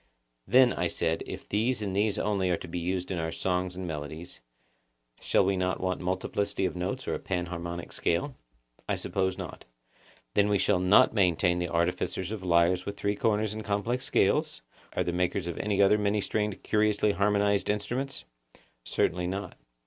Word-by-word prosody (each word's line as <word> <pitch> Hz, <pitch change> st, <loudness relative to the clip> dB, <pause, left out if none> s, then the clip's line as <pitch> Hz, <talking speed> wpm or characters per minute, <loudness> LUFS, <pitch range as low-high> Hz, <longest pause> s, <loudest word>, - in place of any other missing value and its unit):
Then, 125 Hz, +3 st, +6 dB
I 90 Hz, -, 0 dB
said, 80 Hz, -1 st, -1 dB
if -, -, -7 dB
these 110 Hz, +2 st, 0 dB
and 95 Hz, -2 st, -3 dB
these 105 Hz, +1 st, +1 dB
only 100 Hz, -3 st, 0 dB
are 90 Hz, -, +2 dB
to -, -, -9 dB
be 90 Hz, +1 st, -4 dB
used 90 Hz, +1 st, -2 dB
in 90 Hz, -, -2 dB
our 80 Hz, 0 st, -2 dB
songs 90 Hz, 0 st, -1 dB
and 95 Hz, 0 st, -5 dB
melodies, 80 Hz, -1 st, -7 dB, 0.8 s
we -, -, -21 dB
shall -, -, +3 dB
not 95 Hz, -1 st, 0 dB
want 95 Hz, 0 st, -2 dB
multiplicity 95 Hz, +2 st, -1 dB
of -, -, -2 dB
notes 100 Hz, +9 st, -3 dB
or -, -, 0 dB
a -, -, -2 dB
panharmonic 85 Hz, -2 st, -4 dB
scale? 90 Hz, -, 0 dB, 0.6 s
I -, -, +2 dB
suppose 95 Hz, -1 st, -1 dB
not. -, -, -7 dB, 0.7 s
Then 105 Hz, 0 st, +3 dB
we 100 Hz, -, +3 dB
shall 95 Hz, -1 st, +2 dB
not 90 Hz, +4 st, +5 dB
maintain 90 Hz, -3 st, +2 dB
the 90 Hz, -1 st, -2 dB
artificers 85 Hz, +2 st, -1 dB
of 110 Hz, -3 st, -4 dB
lyres 90 Hz, +1 st, +3 dB
with 100 Hz, +1 st, -6 dB
three 100 Hz, +1 st, 0 dB
corners 105 Hz, 0 st, +1 dB
and 110 Hz, 0 st, -6 dB
complex 110 Hz, +5 st, -1 dB
scales, -, -, +1 dB, 0.3 s
or -, -, +3 dB
the 85 Hz, -, -1 dB
makers 90 Hz, +1 st, 0 dB
of 85 Hz, -1 st, -4 dB
any 100 Hz, -1 st, +2 dB
other 105 Hz, +2 st, +5 dB
many 105 Hz, 0 st, +1 dB
stringed 105 Hz, 0 st, -2 dB
curiously 105 Hz, -1 st, +2 dB
harmonised 100 Hz, +1 st, +2 dB
instruments? 125 Hz, +6 st, -2 dB, 0.6 s
Certainly 90 Hz, +7 st, 0 dB
not. 95 Hz, 0 st, -4 dB
95 Hz, 180 wpm, -28 LUFS, 90-105 Hz, 0.8 s, Then